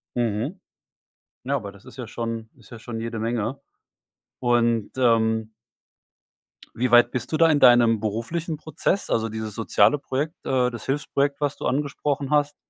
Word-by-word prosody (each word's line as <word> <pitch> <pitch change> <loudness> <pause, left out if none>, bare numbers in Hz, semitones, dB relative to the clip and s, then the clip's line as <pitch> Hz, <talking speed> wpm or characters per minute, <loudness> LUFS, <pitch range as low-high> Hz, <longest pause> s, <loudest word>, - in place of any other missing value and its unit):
Mhm. 120 - -1 0.9
Na, 140 - 0
aber 100 -7 -4
das 100 0 -18
ist - - -13
ja 125 - -6
schon 115 0 -5
ist 120 - -19
ja 120 - -9
schon 115 0 -6
jede 115 0 -4
Menge. 115 +3 -2 0.8
Und, 120 -3 +1
ähm 110 -2 +2 1.2
wie 125 +2 0
weit 120 0 +6
bist 125 -1 -4
du 155 - +2
da 165 0 +5
in 145 -2 +3
deinem 120 -3 +6
beruflichen 120 - -3
Prozess? 160 +6 -2
Also 115 0 +1
dieses 110 -1 -5
soziale 110 +3 +3
Projekt, 145 +4 -3
äh, 125 -2 +2
das 120 -2 -8
Hilfsprojekt, 140 0 0
was 145 -1 -1
du - - -4
angesprochen 140 0 -1
hast. 145 -1 +2
120 Hz, 160 wpm, -24 LUFS, 115-140 Hz, 1.2 s, weit